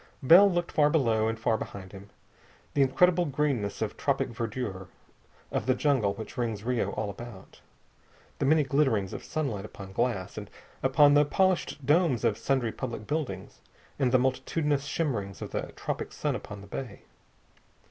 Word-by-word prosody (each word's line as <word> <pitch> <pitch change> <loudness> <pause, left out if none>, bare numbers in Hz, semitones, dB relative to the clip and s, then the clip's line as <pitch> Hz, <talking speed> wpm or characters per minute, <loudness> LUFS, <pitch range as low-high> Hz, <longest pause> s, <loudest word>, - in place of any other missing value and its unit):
Bell 185 +9 +8
looked 175 -1 -1
far 150 -1 +4
below 115 -8 +2
and 110 0 -2
far 110 0 +1
behind 95 -2 -8
him. 100 +1 -12 0.6
The 140 - +2
incredible 175 +6 +4
greenness 140 -8 -1
of - - -5
tropic - - 0
verdure, 115 -5 -4 0.6
of 110 - -2
the 130 - +3
jungle 130 -8 +1
which 110 - -9
rings 110 -4 -2
Rio 125 0 0
all 105 -2 -2
about. 115 -3 -11 0.8
The - - +1
many 155 +1 +5
glitterings 135 -8 +1
of - - -6
sunlight 135 -11 -3
upon 100 -2 -10
glass, 100 -3 -1
and 105 -1 -9 0.3
upon 145 +2 +5
the 145 0 +6
polished 180 -2 0
domes 150 -4 +3
of 110 -2 +1
sundry 125 -1 0
public 115 -4 -5
buildings, 135 - -4 0.4
and 130 -3 +2
the 130 - +6
multitudinous 135 +3 0
shimmerings 110 - -2
of - - -7
the - - -4
tropic - - -4
sun - - -1
upon 105 -2 -8
the 100 - -12
bay. 115 0 -7
125 Hz, 165 wpm, -28 LUFS, 105-145 Hz, 0.8 s, Bell